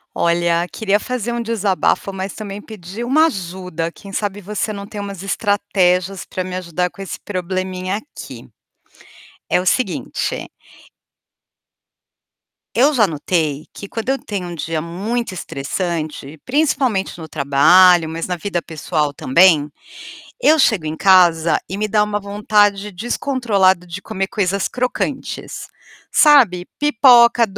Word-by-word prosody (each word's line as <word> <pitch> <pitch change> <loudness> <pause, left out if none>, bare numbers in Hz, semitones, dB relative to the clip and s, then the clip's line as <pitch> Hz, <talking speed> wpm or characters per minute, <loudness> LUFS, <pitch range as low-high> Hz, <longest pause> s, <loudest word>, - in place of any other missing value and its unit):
Olha, 170 0 +1
queria 205 -1 +1
fazer 245 -1 -3
um 235 - -2
desabafo, 210 -4 0
mas 190 0 -5
também 205 -2 -7
pedir 205 +1 -8
uma 310 +6 +4
ajuda, 180 - -5
quem 200 +3 -13
sabe 205 0 -3
você 210 +2 -3
não 200 0 -7
tem 210 - -8
umas 200 -2 -6
estratégias 195 -2 0
para 185 - -4
me 185 0 -6
ajudar 180 0 -2
com 195 - -12
esse 195 - -6
probleminha 185 0 -3
aqui. 290 +7 -11 1.0
É - - +2
o 185 - -6
seguinte 255 +6 -1 2.3
Eu 280 +6 +4
já 220 -6 +4
notei 155 -2 -1
que, 200 - -9
quando 225 +3 -4
eu 270 - +2
tenho 195 -4 -5
um 175 - -6
dia 160 0 -3
muito 195 +8 -3
estressante, 155 -2 -4
principalmente 260 - 0
no 160 -2 -8
trabalho, 160 +5 +5
mas 165 +1 -4
na 180 - -2
vida 175 0 -3
pessoal 155 -2 -2
também, 150 +1 +3 0.7
eu 320 -10 +5
chego 215 - +2
em 155 +1 -3
casa 170 -4 +4
e 190 - -4
me 210 +1 -1
dá 210 0 +3
uma 210 0 -1
vontade 205 0 +1
descontrolada 205 -4 0
de 175 +3 -7
comer 195 -1 -3
coisas 200 -1 -1
crocantes. 250 0 -4 0.4
Sabe? 240 - +5
Pipoca, 240 -4 +5
190 Hz, 135 wpm, -19 LUFS, 175-215 Hz, 2.3 s, trabalho